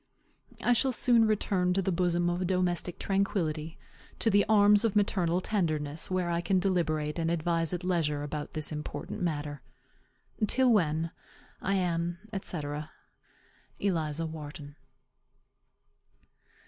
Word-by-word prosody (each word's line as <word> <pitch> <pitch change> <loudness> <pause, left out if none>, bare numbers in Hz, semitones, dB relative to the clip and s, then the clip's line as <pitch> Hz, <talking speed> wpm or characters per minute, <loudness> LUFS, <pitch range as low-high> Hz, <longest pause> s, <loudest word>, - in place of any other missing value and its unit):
I 245 - +4
shall 260 +3 +2
soon 235 -2 +4
return 190 -4 +1
to 195 - +1
the 190 - 0
bosom 175 0 +1
of 175 +1 0
domestic 180 -1 0
tranquillity, 165 -5 -1 0.4
to 225 - +2
the 200 0 +5
arms 205 -1 +6
of 225 -3 +1
maternal 185 -4 +2
tenderness, 155 -7 -1
where 185 -2 0
I 170 0 0
can 190 +2 +1
deliberate 165 -5 0
and 165 0 0
advise 165 0 0
at 180 0 -3
leisure 160 -5 0
about 145 0 -5
this 155 0 -1
important 150 +4 -5
matter. 145 -4 -2 0.9
Till 255 +2 +3
when, 165 -4 +1 0.5
I 195 - 0
am, 175 -2 0 0.2
&c., 175 -4 -3 1.2
ELIZA 165 -5 -1
WHARTON. 150 -2 -8
175 Hz, 125 wpm, -29 LUFS, 155-195 Hz, 1.2 s, arms